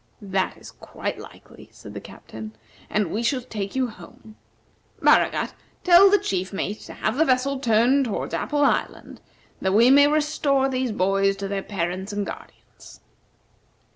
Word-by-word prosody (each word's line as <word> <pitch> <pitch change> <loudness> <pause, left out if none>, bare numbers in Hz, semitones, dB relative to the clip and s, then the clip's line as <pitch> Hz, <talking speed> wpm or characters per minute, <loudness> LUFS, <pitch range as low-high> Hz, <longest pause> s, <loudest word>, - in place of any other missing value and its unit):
"That 190 -1 -2
is - - -12
quite - - -6
likely," - - -14
said - - -12
the - - -7
Captain, 110 -1 -10 0.4
"and 210 -5 -1
we 215 - -2
shall 255 +2 0
take 205 -4 -6
you 260 -1 +1
home. 220 -1 -13 0.6
Baragat, - - +3 0.3
tell 365 +2 +7
the 410 - +5
chief 190 - -3
mate 205 +1 -4
to - - -9
have 215 +4 -2
the 320 - +4
vessel 260 +1 +1
turned 245 +3 +3
toward 220 - -4
Apple 290 -1 0
Island, - - -2 0.4
that 190 - 0
we 235 +4 +6
may 285 +1 +7
restore 295 -2 +1
these 255 -2 -2
boys 195 0 +1
to 195 0 -5
their 195 0 -3
parents 190 0 -4
and 205 0 -3
guardians." - - -12
220 Hz, 160 wpm, -23 LUFS, 195-270 Hz, 0.6 s, tell